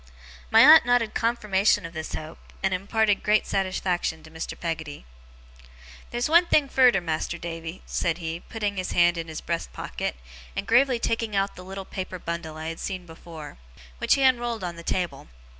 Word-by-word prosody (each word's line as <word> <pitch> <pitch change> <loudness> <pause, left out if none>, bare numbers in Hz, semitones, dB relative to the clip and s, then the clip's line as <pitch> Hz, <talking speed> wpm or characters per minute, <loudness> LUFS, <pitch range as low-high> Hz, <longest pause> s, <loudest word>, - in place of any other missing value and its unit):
My 225 - +7
aunt 310 +4 +9
nodded 245 -2 +2
confirmation 210 -5 +2
of 165 - -8
this 160 -1 -6
hope, 155 +1 -7 0.2
and 190 - +2
imparted 205 +2 +1
great 210 0 +2
satisfaction 185 -4 -1
to 155 - -14
Mr. 160 0 -6
Peggotty. 160 -3 -5 1.0
'Theer's 240 0 -1
one 340 +3 +5
thing 300 -4 +3
furder, 250 -6 +5
Mas'r 165 0 -2
Davy,' 165 +1 -6
said 170 -1 -1
he, 165 -1 -4
putting 205 0 -4
his 185 - -3
hand 175 0 +4
in 165 -1 -4
his 160 -1 -6
breast 170 -1 -3
pocket, - - -4 0.4
and 200 - -3
gravely 250 +3 +4
taking 230 -2 -1
out 195 0 0
the 180 - -10
little 190 +1 -7
paper 185 -1 -5
bundle 170 -2 -5
I 160 +1 -4
had 165 - -7
seen 185 -2 -5
before, 160 - -11 0.4
which - - +3
he 275 - +1
unrolled 240 -4 +2
on 175 -1 -4
the 170 - -9
table. 175 +1 -3
185 Hz, 180 wpm, -25 LUFS, 165-225 Hz, 1.0 s, aunt